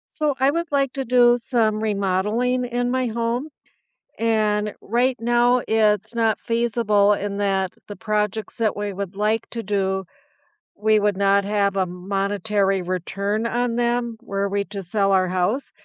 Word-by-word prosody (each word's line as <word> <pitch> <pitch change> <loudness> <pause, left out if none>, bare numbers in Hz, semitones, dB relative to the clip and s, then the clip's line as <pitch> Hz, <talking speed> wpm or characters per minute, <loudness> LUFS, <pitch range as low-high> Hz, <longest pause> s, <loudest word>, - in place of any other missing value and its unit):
So 300 -2 0
I 265 +1 +4
would 335 +1 -3
like 275 -2 +1
to 270 -2 -3
do 245 0 +4
some 225 -3 0
remodeling 215 +5 0
in 245 0 -1
my 255 0 0
home, 235 +5 -2 0.7
and 215 -2 +1
right 245 +4 +1
now 240 +1 +3
it's 215 -1 +2
not 225 -2 +1
feasible 230 -3 +2
in 200 0 -2
that 195 -2 0
the 205 - -7
projects 210 0 -2
that 225 -3 0
we 205 -1 -4
would 195 0 -5
like 215 +2 0
to 230 -1 -4
do, 190 -1 -1 0.7
we 215 0 +3
would 205 -2 +1
not 200 0 +3
have 200 -1 0
a 190 -2 +1
monetary 195 +1 -1
return 200 +5 -2
on 240 0 -1
them 240 -1 0
were 200 -4 -2
we 200 0 -1
to 200 -1 -7
sell 195 +2 0
our 185 -1 +3
house, 185 +9 -1
215 Hz, 160 wpm, -22 LUFS, 200-240 Hz, 0.7 s, I